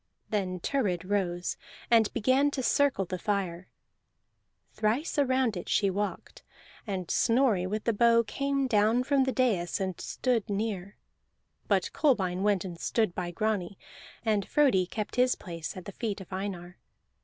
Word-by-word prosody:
Then 185 -4 -1
Thurid 185 -6 -1
rose 180 -3 -1 0.3
and 225 -2 +5
began 260 +6 +3
to 260 - -1
circle 280 -8 +2
the 185 0 -5
fire. 185 -3 -2 1.1
Thrice 230 +9 0
around 260 -5 +2
it 175 - -6
she 200 -2 +2
walked, 205 +2 -4 0.5
and 185 -4 -3
Snorri 230 -7 +3
with 210 +2 -3
the 230 - +1
bow 230 +2 +4
came 275 +4 -1
down 220 +1 +3
from 275 0 +2
the 265 - 0
dais 210 -11 +1
and 190 -2 -3
stood 245 -5 -1
near; 200 -2 -3 0.7
but - - +1
Kolbein 190 - +1
went 200 -2 +1
and 175 -2 -7
stood 220 -3 0
by 175 -1 -3
Grani, 200 0 -2 0.5
and 210 -3 +1
Frodi 230 -12 +3
kept 215 +4 -5
his 250 0 +4
place 170 -1 -7
at 185 - -8
the - - -6
feet 210 0 -3
of 190 -1 -10
Einar. 185 -2 -5
205 Hz, 155 wpm, -29 LUFS, 185-240 Hz, 1.1 s, and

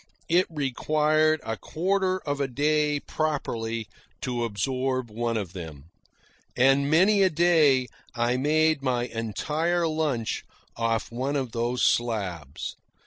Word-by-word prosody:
It 175 +2 +3
required 155 +2 +1
a 110 0 -3
quarter 185 +2 0
of 145 -2 -3
a 140 - +1
day 150 +2 +1
properly 115 -7 -2 0.4
to 125 -3 -2
absorb 130 +3 -2
one 115 +1 -1
of 95 -5 -4
them. 80 -4 -9 0.7
And 135 +2 +4
many 190 +6 +4
a 190 - +5
day 155 -6 +4 0.3
I 120 +1 +1
made 155 +3 +2
my 125 -3 0
entire 150 - -1
lunch 150 -8 -1 0.3
off 115 -1 -1
one 130 +4 -2
of 130 -4 -2
those 120 +2 -1
slabs. 90 - -1
135 Hz, 125 wpm, -26 LUFS, 115-155 Hz, 0.7 s, a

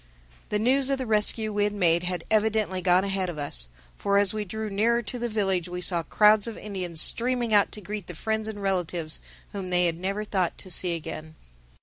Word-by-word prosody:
The 210 - +1
news 260 +5 +3
of 275 - +1
the 260 - -3
rescue 215 0 +1
we 205 0 +1
had 205 0 0
made 170 -3 +3
had 180 -1 -3
evidently 215 -3 +1
gone 180 +1 +4
ahead 195 -2 -1
of 170 - -6
us. 100 - -3 0.3
For 200 0 +2
as 200 -1 +3
we 215 -1 -2
drew 220 +3 -4
nearer 235 +4 +2
to 245 +3 -5
the 240 0 -2
village 195 -5 0
we 180 0 -4
saw 180 -1 +2
crowds 210 +6 +4
of 230 - -6
Indians 185 -5 -3
streaming 240 +3 +1
out 205 -1 +4
to 210 - -7
greet 205 -1 -6
the 175 - -8
friends 220 +5 -2
and 205 -2 -6
relatives 175 -4 -1 0.3
whom 195 -3 -5
they 180 0 +3
had 170 -1 -1
never 195 +3 -2
thought 190 -4 -1
to 185 - -9
see 175 0 -1
again. 155 -1 -7
200 Hz, 220 wpm, -26 LUFS, 180-215 Hz, 0.3 s, gone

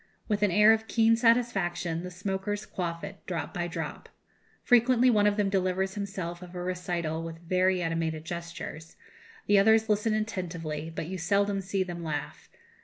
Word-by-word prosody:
With 210 -2 0
an 205 - +4
air 210 +4 +6
of 220 0 -2
keen 225 0 +4
satisfaction 215 -8 +1
the 180 - -6
smokers 195 +3 -3
quaff 170 -2 -4
it, 195 0 -8
drop 170 -5 -3
by 175 -1 -2
drop. 170 - -6 0.5
Frequently 245 0 +5
one 210 -2 +4
of 205 0 +1
them 205 -1 +2
delivers 190 0 0
himself 190 -4 -5
of 180 0 -11
a 175 - -4
recital 175 -3 -2
with 165 0 -6
very 185 0 +2
animated 165 -1 -2
gestures; 170 -2 -7 0.5
the 205 - +5
others 220 +2 +4
listen 215 +1 +2
attentively, 165 -7 -3
but 165 - -5
you 185 +3 -5
seldom 200 +2 +1
see 190 0 -1
them 175 -2 -6
laugh. 150 -3 -5
185 Hz, 170 wpm, -28 LUFS, 170-205 Hz, 0.5 s, air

